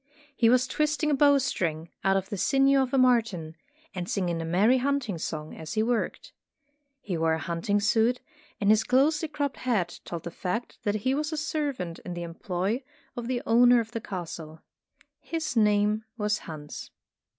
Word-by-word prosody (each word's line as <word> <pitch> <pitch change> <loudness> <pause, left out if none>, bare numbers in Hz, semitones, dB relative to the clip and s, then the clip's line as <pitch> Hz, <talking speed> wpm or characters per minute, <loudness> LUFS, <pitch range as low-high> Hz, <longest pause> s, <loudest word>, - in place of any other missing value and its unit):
He 230 -4 +4
was 250 +1 +4
twisting 305 +2 0
a - - +3
bow 285 0 +5
string 170 - -2
out 195 0 +3
of 190 0 -3
the - - -3
sinews 270 +7 +3
of 260 -1 -1
a - - +3
marten, 225 -11 +2 0.4
and 180 -1 -5
singing 175 -4 -1
a - - -4
merry 205 +10 +3
hunting 255 -9 -1
song 155 -1 -5
as 160 -1 -7
he 215 - +2
worked. 235 0 -2 0.7
He 190 - -3
wore 160 0 +2
a - - -3
hunting 170 +6 -1
suit, 225 +4 +2 0.4
and 205 -2 +4
his 215 0 +4
closely 300 +6 +2
cropped 285 -2 -3
head 210 -9 -1
told 170 -2 -6
the 170 - -6
fact 185 +7 -4
that 205 0 +1
he 260 - +3
was 300 +2 -1
a 315 - -3
servant 285 - -3
in 180 - -7
the 175 - -4
employ 180 +7 -2 0.3
of 240 -1 -5
the 250 -1 -2
owner 245 +1 +6
of 225 0 -4
the 230 - -4
castle. 165 -5 -7 0.6
His 320 -5 -4
name 210 0 +3
was 210 -1 0
Hans. 150 -2 -8
215 Hz, 185 wpm, -27 LUFS, 175-255 Hz, 0.7 s, owner